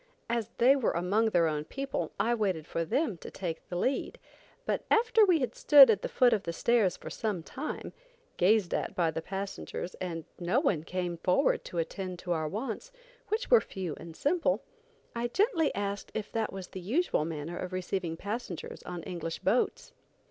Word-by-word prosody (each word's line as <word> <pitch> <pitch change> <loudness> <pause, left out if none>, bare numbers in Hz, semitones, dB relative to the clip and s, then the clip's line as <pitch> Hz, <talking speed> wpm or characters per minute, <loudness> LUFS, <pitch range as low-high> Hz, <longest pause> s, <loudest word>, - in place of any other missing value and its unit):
As 235 -3 -1
they 255 +4 +6
were 265 -5 +1
among 195 +6 +2
their 175 -5 +3
own 150 -1 -1
people, 270 - -3
I 235 - +2
waited 190 -9 0
for 165 - -2
them 220 - 0
to - - -8
take 170 -4 -5
the 175 - -4
lead; 260 +10 -1 0.5
but - - -1
after 450 0 +5
we 360 -7 +4
had 255 - -1
stood 275 -5 +8
at 205 -2 0
the - - -3
foot 245 -2 +4
of 215 - +1
the 170 - -4
stairs 220 0 +2
for - - -8
some 205 -7 -2
time, 280 - -6 0.4
gazed 200 -1 +3
at - - -2
by 170 -3 +2
the 160 +1 -3
passengers, 190 0 -5
and 165 -3 -4
no 180 +8 +2
one 200 - +1
came 180 -1 -3
forward 180 +2 +2
to 175 - -7
attend 185 +2 -3
to 175 - -5
our 160 -2 0
wants, 225 - -4 0.4
which 445 +4 -2
were 480 - +8
few 185 -5 -5
and 165 0 -10
simple, 335 +4 +1 0.5
I 235 +1 0
gently 330 - +2
asked 200 0 -3
if 215 - -3
that 225 -1 -1
was 190 -1 -7
the 185 - -7
usual 240 - +1
manner 160 +1 -4
of 185 - -4
receiving 185 -2 -2
passengers 205 -3 -5
on 175 -2 -6
English 165 -3 -4
boats. - - 0
195 Hz, 190 wpm, -30 LUFS, 175-240 Hz, 0.5 s, stood